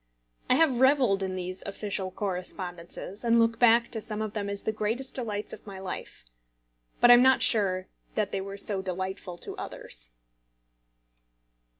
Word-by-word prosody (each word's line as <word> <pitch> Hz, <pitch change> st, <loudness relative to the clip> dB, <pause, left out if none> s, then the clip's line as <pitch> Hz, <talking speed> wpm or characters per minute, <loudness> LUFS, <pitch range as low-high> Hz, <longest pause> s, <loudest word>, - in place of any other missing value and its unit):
I -, -, +6 dB
have 275 Hz, -5 st, +3 dB
revelled 260 Hz, -7 st, +4 dB
in 190 Hz, -1 st, -2 dB
these 185 Hz, 0 st, -5 dB
official 200 Hz, -1 st, -3 dB
correspondences, 185 Hz, 0 st, -4 dB
and 235 Hz, 0 st, +4 dB
look 230 Hz, 0 st, +2 dB
back 235 Hz, 0 st, +5 dB
to 225 Hz, -, -1 dB
some 210 Hz, -1 st, -3 dB
of 215 Hz, -1 st, -3 dB
them 205 Hz, -2 st, -3 dB
as 200 Hz, 0 st, -2 dB
the -, -, 0 dB
greatest 225 Hz, +5 st, -3 dB
delights 215 Hz, -5 st, -2 dB
of -, -, -11 dB
my 195 Hz, -1 st, -7 dB
life. 190 Hz, -, -7 dB, 0.7 s
But 240 Hz, -, +7 dB
I -, -, +12 dB
am 240 Hz, -, +8 dB
not 260 Hz, +1 st, +5 dB
sure 185 Hz, -4 st, +3 dB, 0.3 s
that 210 Hz, -2 st, 0 dB
they 195 Hz, -, -2 dB
were 195 Hz, +1 st, -7 dB
so 200 Hz, -1 st, 0 dB
delightful 185 Hz, -1 st, -4 dB
to -, -, -8 dB
others. -, -, -5 dB
200 Hz, 170 wpm, -28 LUFS, 185-230 Hz, 0.7 s, I